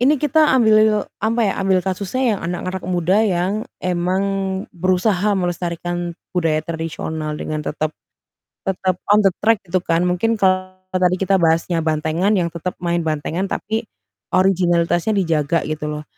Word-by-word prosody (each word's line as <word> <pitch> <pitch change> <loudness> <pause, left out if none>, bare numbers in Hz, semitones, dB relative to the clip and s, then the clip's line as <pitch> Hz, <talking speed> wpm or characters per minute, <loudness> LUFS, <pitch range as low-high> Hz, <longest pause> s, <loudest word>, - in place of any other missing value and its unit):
ini 280 +5 +4
kita 300 +2 +3
ambil 215 -3 +4 0.2
apa 225 +3 0
ya, 200 - +2
ambil 190 -1 +3
kasusnya 205 +5 0
yang - - -9
anak-anak 180 +2 -3
muda 180 +2 +2
yang 185 -3 +1 0.3
emang 180 +2 0 0.5
berusaha 185 +3 +1
melestarikan 175 -1 -3 0.2
budaya 160 -3 0
tradisional 160 -2 -4
dengan 155 0 -3
tetap 155 +1 -3 0.7
tetap 185 -1 0 0.2
on 210 - +5
the 195 - +5
track 225 -1 +3
gitu 185 0 -1
kan. 165 -1 +1
Mungkin 180 +6 +1
kalau 185 -1 +2 0.2
tadi 185 0 +1
kita 195 0 +3
bahasnya 165 0 +1
bantengan 160 +5 +1
yang 175 -4 +1
tetap 170 +2 -4
main 170 -1 0
bantengan, 160 +4 -1
tapi 220 +3 -3 0.5
originalitasnya 175 0 +2
dijaga 165 -4 +1
gitu 155 0 -3
loh. 150 0 -5
180 Hz, 145 wpm, -20 LUFS, 170-195 Hz, 0.7 s, on